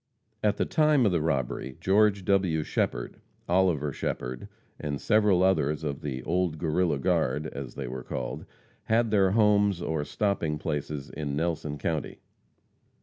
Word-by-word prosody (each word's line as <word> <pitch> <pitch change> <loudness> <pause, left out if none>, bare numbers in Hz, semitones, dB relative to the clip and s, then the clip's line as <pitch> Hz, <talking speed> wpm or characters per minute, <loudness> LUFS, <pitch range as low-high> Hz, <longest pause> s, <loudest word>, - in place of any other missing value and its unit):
At 105 -1 +2
the - - +1
time 150 -5 +3
of 100 - +3
the 85 -3 +1
robbery, 65 -3 -2
Geo. 105 +3 +4
W. 95 -5 0
Shepherd, - - -2 0.3
Oliver 85 -6 +2
Shepherd, 60 0 -4 0.3
and 70 -2 -3
several 105 -4 +3
others 80 -5 +2
of 70 -3 -3
"the 65 -3 -4
old 90 -2 0
Guerrilla 80 0 +1
guard," 70 +2 0
as 70 -4 -7
they 70 -3 -4
were 65 0 -6
called, 60 -1 -5 0.4
had 115 0 +2
their 100 -3 +4
homes 105 -2 +3
or 80 -3 -2
stopping 85 -4 -1
places 75 -2 -4
in 70 -2 -4
Nelson 80 -2 -2
county. 80 -1 -3
80 Hz, 145 wpm, -28 LUFS, 70-100 Hz, 0.4 s, Geo